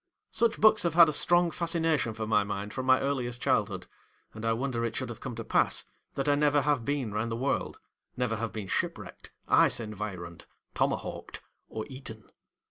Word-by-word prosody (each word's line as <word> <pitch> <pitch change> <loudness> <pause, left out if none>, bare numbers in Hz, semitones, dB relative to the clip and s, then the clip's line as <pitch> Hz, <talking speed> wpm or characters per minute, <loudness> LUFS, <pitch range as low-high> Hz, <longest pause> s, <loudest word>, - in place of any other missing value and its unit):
Such 230 0 +1
books 215 0 +6
have 170 -2 0
had 170 -2 +8
a - - -1
strong 175 +3 +3
fascination 165 -8 0
for 110 0 -3
my 105 -1 +3
mind 100 0 -5
from 130 0 -4
my 130 0 +6
earliest 125 -3 -2
childhood; - - 0 0.5
and 110 - -9
I 115 - +1
wonder 120 0 -1
it 115 -1 -2
should 130 -2 -3
have 115 - -7
come 125 -3 -6
to 115 - -5
pass - - +1 0.3
that 135 +1 -2
I 145 - +5
never 145 0 +3
have 145 -4 +1
been 135 -5 -2
round 110 +2 -2
the - - -1
world, 135 +4 -1 0.4
never 125 -3 0
have 115 0 -3
been 110 -3 -5
shipwrecked, - - -4 0.2
ice - - +4
environed, 100 -6 -6 0.3
tomahawked, - - -2 0.3
or 110 - -5
eaten. 130 -5 -10
125 Hz, 190 wpm, -29 LUFS, 110-145 Hz, 0.5 s, had